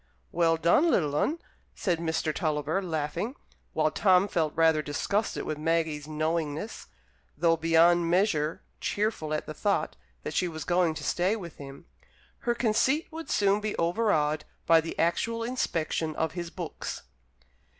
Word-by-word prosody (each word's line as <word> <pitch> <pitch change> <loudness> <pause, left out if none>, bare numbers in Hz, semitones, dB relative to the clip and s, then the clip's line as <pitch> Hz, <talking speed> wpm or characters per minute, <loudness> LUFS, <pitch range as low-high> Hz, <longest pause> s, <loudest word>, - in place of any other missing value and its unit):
"Well 165 -1 +2
done, 170 - +4
little 150 - +1
'un," 300 - +1 0.4
said 175 -4 0
Mr. 160 -1 -1
Tulliver, 155 +3 -1
laughing, 170 - -3 0.4
while 155 0 +2
Tom 190 -1 +4
felt 160 -5 -1
rather 160 -1 +4
disgusted 200 +9 -1
with 155 -1 -4
Maggie's 160 -2 0
knowingness, 155 +4 -2 0.5
though 165 -1 +3
beyond 165 +1 +4
measure 170 -4 +1 0.2
cheerful 205 -7 -1
at 155 - -1
the 155 - -6
thought 200 +5 0 0.3
that - - -4
she 180 - +1
was 160 -2 -6
going 175 -2 +2
to - - -6
stay 185 +5 +1
with 175 -7 -8
him. 140 +2 -10 0.5
Her 240 -1 0
conceit 260 +7 +1
would 325 +1 -7
soon 200 0 +2
be 215 0 -3
overawed 165 -5 +1 0.2
by 165 -1 +6
the 165 - -6
actual 230 +7 0
inspection 165 -10 -1
of 160 -1 -1
his 170 -1 -5
books. 175 -2 -6
165 Hz, 150 wpm, -28 LUFS, 155-200 Hz, 0.5 s, by